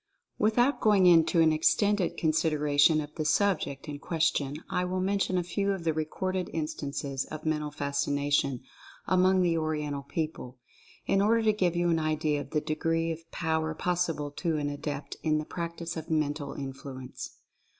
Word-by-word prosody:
Without 240 +6 +2
going 205 -4 +5
into 170 -1 +5
an 160 -1 +5
extended 200 +4 +2
consideration 155 -1 +3
of 150 0 -8
the 155 - -3
subject 155 -5 +1
in 145 -1 -6
question 150 -4 0
I 180 - -1
will 185 +1 -2
mention 190 0 0
a 180 - +1
few 200 +3 -1
of 190 -3 -5
the 160 -1 +1
recorded 180 +4 -2
instances 140 -3 -3
of 155 0 -8
Mental 150 -1 0
Fascination 140 -2 0 0.4
among 185 0 +3
the 170 -2 +2
Oriental 150 -2 -2
people, 140 -3 -5 0.5
in 195 - +2
order 225 +3 +3
to 215 -1 +4
give 180 -4 +1
you 175 0 +1
an 165 - +2
idea 155 -1 0
of - - -9
the 150 - 0
degree 165 +2 0
of 165 0 -8
power 160 -1 -1
possible 165 -5 -1
to 160 +1 -1
an 145 -1 -1
adept 145 0 -5
in 155 -1 +1
the 155 - -3
practice 170 0 -5
of 160 - -6
Mental 145 -2 -1
Influence. 135 -1 -7
160 Hz, 165 wpm, -29 LUFS, 145-180 Hz, 0.5 s, going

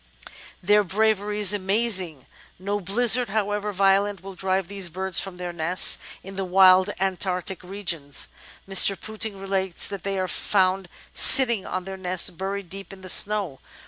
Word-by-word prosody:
Their 205 +3 +3
bravery 210 +1 -1
is 205 -1 +5
amazing; 190 - -1 0.3
no 200 +3 -4
blizzard, 235 +5 +1
however 210 0 -3
vio 195 0 +2
lent, 200 -3 -7
will 195 0 -10
drive 190 -1 -3
these 195 -2 -2
birds 190 +2 -1
from 195 -2 -7
their 180 -1 -7
nests 170 +2 +4 0.2
in 195 0 -11
the 195 - -3
wild 185 +1 +4
Antarctic 190 0 -2
regions. 175 -7 -3 0.4
Mr. 195 0 +5
Pouting 220 -2 -5
relates 190 -2 -2
that 200 -2 -6
they 195 0 -4
are 185 0 -2
found 190 -1 -1 0.2
sitting 235 -7 +6
on 185 - -5
their 190 +1 -9
nests 185 -1 0
buried 195 +2 -6
deep 195 +1 -11
in 195 -1 -14
the 185 - -11
snow. 195 -8 0
195 Hz, 160 wpm, -23 LUFS, 185-205 Hz, 0.4 s, sitting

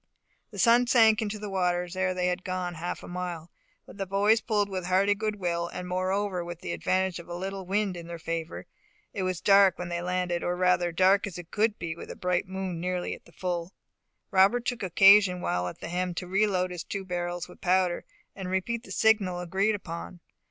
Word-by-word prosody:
The 205 - -11
sun 235 +4 +5
sunk 225 -3 +5
into 215 -1 -3
the 210 0 -6
waters 180 -1 0
ere 185 0 0
they 180 0 0
had 180 0 -1
gone 185 -1 -3
half 170 +1 -5
a - - -9
mile; 175 -2 -5 0.3
but - - -14
the 195 - -2
boys 205 +4 +3
pulled 210 -2 +1
with 185 -2 -4
a - - -5
hearty 195 +2 +3
good 215 0 -2
will, 170 -3 -2
and 180 +1 -6
moreover 185 0 -1
with 175 -1 -8
the 85 - -4
advantage 185 - 0
of 170 - -11
a 175 - -4
little 190 +1 -5
wind 200 -1 0
in 170 -1 -8
their 170 0 -6
favour. 165 0 -5 0.5
It 200 - -3
was 185 -2 -2
dark 195 -2 +5
when 180 -1 -5
they 175 0 -2
landed, 180 -1 -1
or 175 - 0
rather, 180 -1 +2
dark 190 +4 +3
as 185 - -7
it 175 -1 -10
could 215 0 +1
be 165 -1 -4
with - - -10
a - - -6
bright 180 +1 -1
moon 190 -2 -4
nearly 180 +1 -2
at - - -12
the - - -18
full. 175 0 -4 0.6
Robert 200 +5 +4
took 245 -2 -2
occasion 195 0 +6
while 90 - -1
at 90 - -8
the - - -6
helm 180 0 -2
to 180 - -4
re 195 +4 +2
load 185 -2 0
his 175 -2 -5
two 195 -1 -5
barrels 175 -1 -3
with 180 - -16
powder, 185 -1 +2 0.3
and 190 -2 -5
repeat 190 +5 -1
the - - -12
signal 205 -5 +2
agreed 190 +5 0
upon. 175 -1 -7
185 Hz, 220 wpm, -28 LUFS, 175-200 Hz, 0.6 s, occasion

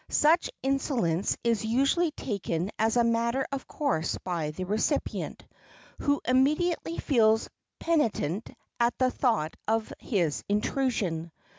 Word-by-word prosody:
Such 320 +4 +3
insolence 255 - 0
is 230 -2 +1
usually 275 +9 +2
taken 200 - -3
as 225 +2 +2
a 240 - +5
matter 235 +3 +1
of 275 -1 -4
course 270 - -1
by 170 -4 -2
the 160 +5 -5
recipient, 215 - -1 0.5
who 285 0 +1
immediately 305 +6 +2
feels 225 -5 +3 0.3
penitent 230 - 0 0.3
at 235 0 +2
the 255 -1 +2
thought 220 - 0
of 220 0 0
his 175 - -1
intrusion. 205 -7 0
230 Hz, 120 wpm, -28 LUFS, 200-275 Hz, 0.5 s, a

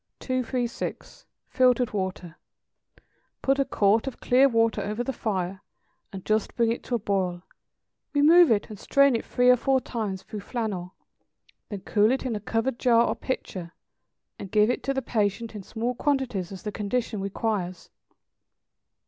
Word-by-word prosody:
236. 255 -2 -3 0.2
=Filtered 250 -2 +2
Water.= 185 -4 -4 1.1
Put 270 +1 +2
a 275 - +3
quart 215 +3 +2
of 270 - -5
clear 265 +3 +4
water 230 -3 +2
over 210 +4 -2
the 270 - -3
fire, 190 -4 -3 0.5
and 190 -2 -8
just 215 -1 0
bring 230 -1 +2
it 235 - -3
to 245 - -1
a - - +2
boil; 190 -4 -1 0.7
remove 320 +4 +6
it, 215 -3 +2
and 210 - -9
strain 280 -2 +4
it 230 - -2
three 250 0 +3
or - - +7
four 265 +2 +2
times 210 -7 -4
through 215 - -7
flannel; 200 -5 -4 0.7
then 205 -4 -6
cool 210 +3 +2
it 265 +1 -1
in 240 -3 -1
a - - -3
covered 225 +4 -2
jar 235 -1 +4
or - - -1
pitcher, 185 -9 -5 0.7
and 195 - -7
give 210 +3 +4
it - - -3
to 275 - -1
the 265 - -1
patient 220 0 -1
in 210 - -6
small 230 +5 -3
quantities 250 - -1
as 190 - -9
the 210 - -3
condition 215 0 -2
requires. 195 -2 -3
225 Hz, 165 wpm, -26 LUFS, 200-250 Hz, 1.1 s, or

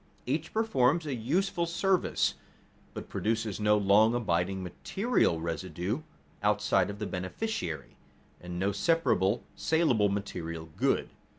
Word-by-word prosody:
Each 150 +6 -2
performs 170 - +2
a 145 - -2
useful 170 - 0
service, 185 +2 +1 0.6
but - - -6
produces 110 -2 -1
no 105 0 +4
long 105 +3 +5
abiding 95 -4 0
material 190 - 0
result 90 - -3 0.4
outside 105 -2 +2
of 100 - -5
the 105 - -3
beneficiary, 90 - -4 0.4
and 90 0 -7
no 95 +3 +1
separable, 105 - +2
salable 130 -11 +2
material 85 -5 -4
good. - - +1
105 Hz, 115 wpm, -30 LUFS, 95-155 Hz, 0.6 s, long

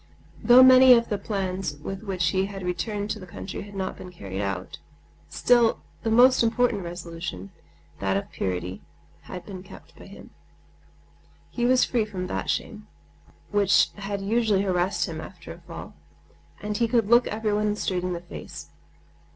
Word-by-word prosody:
Though 250 +1 +8
many 255 0 +9
of 235 -1 +3
the 205 - -1
plans 190 -5 -3
with 190 +7 -7
which 185 -5 -1
he 190 +1 0
had 195 -2 -8
returned 205 +4 -3
to 215 - -4
the 185 - -11
country 185 +2 -7
had 205 0 -11
not 190 -1 -3
been 185 - -9
carried 95 - -6
out, 90 -6 -4 0.5
still 240 -2 +3 0.2
his 225 - 0
most 250 +3 +6
important 235 -2 +1
resolution—that 165 - -6
of 100 - -5
purity—had 90 - -6
been 185 -1 -8
kept 185 - -15
by - - -13
him. - - -13 1.2
He 240 - -1
was 255 +1 +4
free 235 -4 0
from 190 -4 -5
that - - -4
shame, 215 -1 -3 0.6
which 205 -1 +4
had 200 0 -5
usually 215 -2 +2
harassed 185 0 0
him 160 -3 -6
after 180 -1 -10
a 170 - -15
fall; 170 0 -10 0.7
and 210 0 -3
he 235 - +2
could 230 -2 +1
look 235 +2 +5
everyone 210 -1 0
straight 185 -3 -2
in 180 0 -2
the 170 - -5
face. 175 - -10
195 Hz, 160 wpm, -25 LUFS, 175-220 Hz, 1.2 s, many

